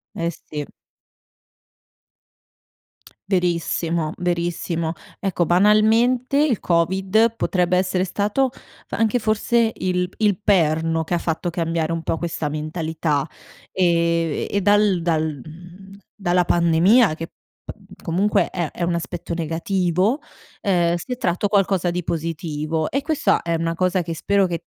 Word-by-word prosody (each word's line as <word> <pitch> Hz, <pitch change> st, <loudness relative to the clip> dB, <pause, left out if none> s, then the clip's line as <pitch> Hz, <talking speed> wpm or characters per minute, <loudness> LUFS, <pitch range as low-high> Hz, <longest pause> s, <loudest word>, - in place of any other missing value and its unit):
Eh, 170 Hz, 0 st, -1 dB
sì. 150 Hz, -2 st, -7 dB, 2.7 s
Verissimo, 170 Hz, -3 st, 0 dB
verissimo, 170 Hz, -1 st, -2 dB, 0.3 s
ecco, 185 Hz, -3 st, 0 dB
banalmente, 220 Hz, -, +3 dB
il 260 Hz, -9 st, +1 dB
Covid 190 Hz, +6 st, +2 dB
potrebbe 180 Hz, -4 st, +1 dB
essere 185 Hz, 0 st, +1 dB
stato, 210 Hz, +8 st, 0 dB, 0.4 s
anche 225 Hz, +2 st, +1 dB
forse 225 Hz, +1 st, +1 dB
il 180 Hz, -1 st, -1 dB
p -, -, -25 dB
il 205 Hz, -2 st, +2 dB
perno 165 Hz, -4 st, +2 dB
che 160 Hz, -, -4 dB
ha 175 Hz, -, +2 dB
fatto 170 Hz, +1 st, -2 dB
cambiare 165 Hz, -1 st, -1 dB
un 165 Hz, 0 st, -2 dB
po' 165 Hz, -, -2 dB
questa 165 Hz, -2 st, -3 dB
mentalità, 155 Hz, -1 st, -2 dB, 0.4 s
ehm, 170 Hz, -3 st, +1 dB
e 200 Hz, -, 0 dB
dal 205 Hz, -3 st, +3 dB
dal 155 Hz, -4 st, -1 dB
mhmm, 180 Hz, +5 st, -13 dB, 0.2 s
dalla 180 Hz, -3 st, +1 dB
pandemia 175 Hz, +6 st, +4 dB
che 165 Hz, +1 st, -6 dB, 0.3 s
pa -, -, -8 dB, 0.3 s
comunque 190 Hz, +5 st, +1 dB
è 170 Hz, -4 st, -3 dB
è -, -, -10 dB
un 170 Hz, 0 st, +1 dB
aspetto 170 Hz, 0 st, -4 dB
negativo, 180 Hz, -, 0 dB, 0.4 s
ehm, 175 Hz, -4 st, +2 dB
si 175 Hz, +8 st, -7 dB
è -, -, -7 dB
tratto 185 Hz, -1 st, 0 dB
qualcosa 195 Hz, -3 st, +2 dB
di 180 Hz, +1 st, -3 dB
positivo; 160 Hz, -1 st, -3 dB
e 275 Hz, +1 st, -1 dB
questa 310 Hz, -1 st, +1 dB
è 170 Hz, -, -1 dB
una 165 Hz, 0 st, -1 dB
cosa 185 Hz, +1 st, +1 dB
che 165 Hz, -1 st, -5 dB
spero 200 Hz, +3 st, +2 dB
che, 170 Hz, -2 st, -4 dB
175 Hz, 135 wpm, -21 LUFS, 165-195 Hz, 2.7 s, pandemia